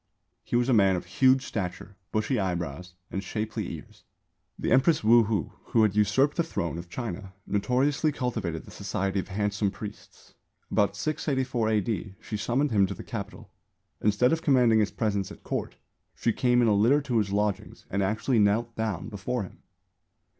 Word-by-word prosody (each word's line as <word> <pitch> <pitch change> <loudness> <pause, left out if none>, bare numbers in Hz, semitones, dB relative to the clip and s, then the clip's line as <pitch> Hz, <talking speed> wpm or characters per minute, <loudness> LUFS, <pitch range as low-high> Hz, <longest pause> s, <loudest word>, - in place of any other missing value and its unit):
He - - -3
was 120 +1 +3
a 130 - +3
man 95 -4 +5
of 90 - -4
"huge 130 0 +3
stature, 95 0 -5 0.2
bushy 110 +4 0
eyebrows 90 -2 -3 0.2
and 95 - -3
shapely 105 +2 -3
ears." - - -14 0.5
The - - -2
Empress 135 +4 +4
Wu 115 +1 +6
Hou, 100 -8 -1
who 115 - +3
had 105 -2 +2
usurped 130 - +3
the 170 - +3
throne 85 - -3
of 85 0 -9
China, 95 -3 -5
notoriously 130 +9 +1
cultivated 110 - -3
the - - -13
society 95 +1 -2
of - - -4
handsome 105 +1 0
priests. 105 +1 -10 0.4
About 100 -1 +2
684 130 -3 -1
A.D. 105 -2 -1
she 110 - -6
summoned 125 +7 0
him 100 -3 +4
to 100 - -5
the - - -9
Capital. - - -7 0.5
Instead 105 +6 +3
of 165 - 0
commanding 125 -7 +4
his 105 -1 +2
presence 100 -4 -1
at - - -12
Court - - -3 0.4
she 115 - 0
came 125 -1 +3
in - - +3
a 105 - +4
litter 120 +8 +4
to 120 -5 +1
his 100 -2 -1
lodgings 105 0 -2
and 100 - 0
actually 110 +5 +1
knelt 110 +3 +2
down 110 -5 -2
before 110 +2 -3
him. 95 - -11
105 Hz, 175 wpm, -27 LUFS, 100-125 Hz, 0.5 s, Wu